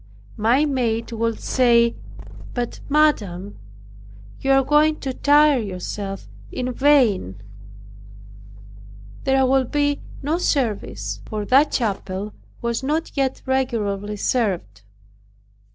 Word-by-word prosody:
My 240 +7 +3
maid 240 -5 -1
would 230 0 -2
say, 235 -2 +3 0.6
"But, 245 -1 -3
madam, 205 - +1 0.8
you 270 - -3
are 270 0 +5
going 300 +3 +3
to 265 -2 -3
tire 290 0 +4
yourself 195 - -5 0.2
in 250 0 -3
vain. 240 - +2 1.9
There 265 0 +3
will 265 0 +3
be 290 +2 0 0.2
no 310 +5 0
service." 195 - -2
For 210 -1 -4
that 275 +7 +4
chapel 200 -3 -2 0.3
was 235 0 -1
not 305 +5 -2
yet 270 -2 -1
regularly 210 -6 -1
served. 195 - -1
245 Hz, 105 wpm, -22 LUFS, 205-275 Hz, 1.9 s, are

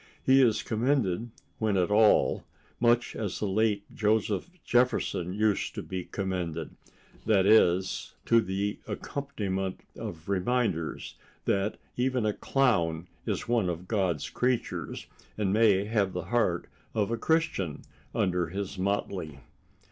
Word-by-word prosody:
He 135 +1 +6
is 115 -4 +3
commended, 115 -3 0 0.3
when 110 -3 +1
at 90 +1 +1
all, 105 +1 +4 0.4
much 120 0 +2
as 105 -4 -3
the - - -2
late 105 0 +1
Joseph 105 - +1 0.2
Jefferson 120 -7 +1
used 105 +1 0
to - - -4
be 95 -1 -5
commended—that 95 +2 -2
is, 95 -3 +3
to 115 0 +5
the 100 +1 -2
accompaniment 100 -10 -3
of 80 -1 -7
reminders 100 -4 -1 0.3
that 100 +2 0 0.2
even 125 -2 +1
a 105 - +1
clown 85 -14 +1 0.2
is - - -2
one 115 -6 +2
of 90 +1 -5
God's 90 -9 0
creatures, 125 -1 -1 0.3
and 100 -3 +1
may 105 -3 +4
have 105 -3 0
the 90 - -3
heart 90 -8 +2 0.3
of 105 0 +1
a - - +2
Christian 160 - 0 0.3
under 90 -2 +1
his 95 +2 -5
motley. 95 -5 -2
100 Hz, 125 wpm, -29 LUFS, 95-115 Hz, 0.4 s, He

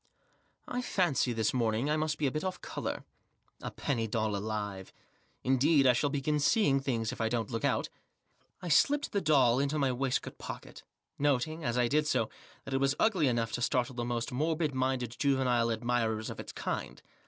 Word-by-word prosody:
m 245 - -4
I - - +1
fancy 175 - +1
this 110 -2 0
morning 115 +1 +1
I 150 - +2
must 155 0 -1
be 150 - -1
a 135 - +2
bit 155 - -3
off 185 -1 -3
colour. - - -4 0.6
A - - -4
penny 115 -5 -2
doll 110 -1 -1
alive, 105 -2 -4 0.5
indeed! 135 +3 +4
I 125 - +6
shall 145 +4 +1
begin 150 +1 0
seeing 145 - +3
things 115 -5 -1
if - - -6
I 110 - +1
dont 115 -3 -1
took 115 -2 -3
out." - - +1 0.7
I - - -4
slipped 285 - +3
the 200 - 0
doll 135 -6 +4
into 140 +2 0
my 135 -3 +2
waistcoat 130 +1 -2
pocket; - - -8 0.4
noting, 145 +3 0
as 120 -2 -1
I 120 -1 +3
did 150 +4 +1
so, - - +1 0.4
that 135 - -5
it - - +3
was 135 +1 +2
ugly 185 -10 +3
enough 115 -2 0
to 120 - -3
startte 125 +1 0
the 120 - -2
most 120 0 -2
mortwd 155 +3 0
minded 130 -2 -1
juvenile 130 -4 +2
admirers 115 -1 -1
of - - -9
Its - - -7
kind. - - -4
130 Hz, 195 wpm, -31 LUFS, 115-150 Hz, 0.7 s, I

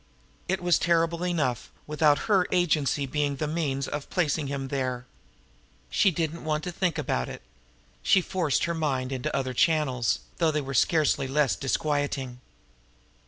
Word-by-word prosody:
It 190 -1 -1
was 175 -2 +3
terrible 170 0 +1
enough 155 -9 -1 0.2
without 150 -1 +2
her 195 -4 +3
agency 155 -6 +1
being 145 +1 -1
the 155 - -2
means 150 -4 -1
of 150 -1 -5
placing 155 -4 0
him 135 -1 -4
there! 130 -2 -2 0.9
She 195 - +4
did 165 -3 -1
not 170 - -9
want 155 0 -1
to 180 - -3
think 180 -2 -1
about 65 0 -1
it. - - -9 0.6
She 190 - +4
forced 175 -6 0
her 170 - 0
mind 135 -5 -1
into 130 -2 -2
other 130 -1 -1
channels, 130 -5 +1 0.2
though 165 -2 +3
they 155 -1 0
were 135 0 -6
scarcely 150 -1 +2
less 140 0 +2
disquieting. 135 -3 -2
150 Hz, 160 wpm, -27 LUFS, 135-170 Hz, 0.9 s, She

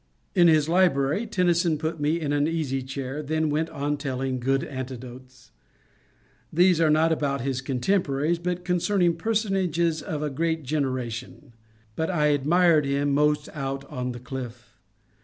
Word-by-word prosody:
In 175 -3 +5
his 155 -2 +4
library 170 +2 +2
Tennyson 175 -4 +2
put 160 +1 -3
me 150 +3 +1
in 145 -3 -2
an 145 +1 +2
easy 150 -5 -1
chair, 135 +2 -5
then 155 +1 -1
went 160 +2 0
on 145 +1 -2
telling 130 -2 -3
good 135 +2 +1
anecdotes, 130 -2 -8 0.5
— - - -37 0.3
these 175 +1 +4
not 160 0 +3
about 140 -4 0
his 135 0 -2
contemporaries, 145 +3 0
but 180 +1 -3
concerning 180 -1 +2
personages 185 -5 0
of 150 -1 -4
a 150 - -2
past 160 +2 -1
genera 130 -3 -1
tion. 120 +1 -9 0.4
But 160 - -1
I 150 -5 +2
admired 155 +1 +3
him 140 +1 0
most 150 +1 +2
out 135 -2 -4
on 125 0 -3
the 120 - -7
cliff. 125 -1 -8
150 Hz, 155 wpm, -25 LUFS, 135-165 Hz, 0.5 s, In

